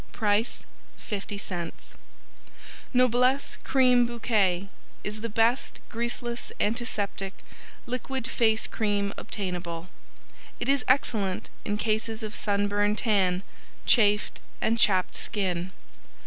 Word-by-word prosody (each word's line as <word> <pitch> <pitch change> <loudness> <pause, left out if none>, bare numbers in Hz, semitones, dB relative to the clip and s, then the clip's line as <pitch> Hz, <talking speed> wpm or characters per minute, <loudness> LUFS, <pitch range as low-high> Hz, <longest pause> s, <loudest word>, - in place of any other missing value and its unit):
Price 215 +2 +1 0.4
50c 195 -4 -4 1.2
Noblesse 255 +2 +3
Cream 250 -2 +4
Bouquet 205 -6 +1 0.4
is 210 +1 -4
the 230 - -3
best 230 +4 +1
Greaseless, 240 +1 -3
Antiseptic, 205 -3 -1 0.5
Liquid 255 +1 -3
Face 225 -4 +2
Cream 205 -2 0
obtainable; 180 -3 -4 0.7
it 240 - -3
is 275 -1 +3
excellent 215 -7 +1
in 205 -1 -1
cases 220 +1 -1
of 215 -1 -5
Sunburn 205 0 +1
Tan, 195 -5 +2 0.4
Chafed 210 -3 +4 0.2
and 230 +1 +1
Chapped 185 -4 +4
Skin. 185 -4 -1
215 Hz, 95 wpm, -27 LUFS, 200-240 Hz, 1.2 s, Cream